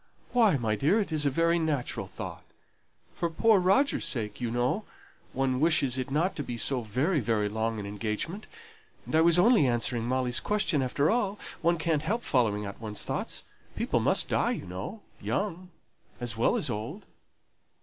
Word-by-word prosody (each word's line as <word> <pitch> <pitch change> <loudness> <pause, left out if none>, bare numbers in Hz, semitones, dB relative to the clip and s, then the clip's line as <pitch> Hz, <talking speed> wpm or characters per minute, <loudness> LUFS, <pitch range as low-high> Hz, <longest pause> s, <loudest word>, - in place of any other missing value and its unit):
"Why, 225 - +4
my 110 -3 0
dear, 150 - +2
it 200 - -2
is 150 -2 +1
a - - +4
very 165 +4 +2
natural 155 -6 -2
thought. - - -7 0.7
For 170 - -2
poor 210 +5 +4
Roger's 195 +11 +2
sake, 110 -3 -4
you 120 - -1
know, 120 - 0 0.5
one 130 -1 0
wishes 140 -5 +2
it 130 - -3
not 160 +7 0
to 145 - -2
be 120 - -5
so 130 +2 +1
very, 130 - 0
very 110 -3 0
long 110 +1 -2
an 100 - -5
engagement; 105 - -4 0.6
and - - -8
I 160 - +6
was 170 +1 +6
only 210 - +5
answering 120 -1 0
Molly's 125 0 +1
question, 195 -8 0
after 140 +4 +1
all. 210 -4 0 0.2
One 170 +1 +2
can't 155 -2 0
help 220 +9 -1
following 105 -6 +1
out 100 +3 -8
one's 105 -2 -3
thoughts. - - -3 0.3
People - - 0
must - - +3
die, - - +1
you - - -6
know 95 - -6 0.2
young, 185 -3 -2 0.5
as 120 -3 -3
well 115 - +2
as - - -1
old." 120 - -5
140 Hz, 180 wpm, -28 LUFS, 115-175 Hz, 0.7 s, I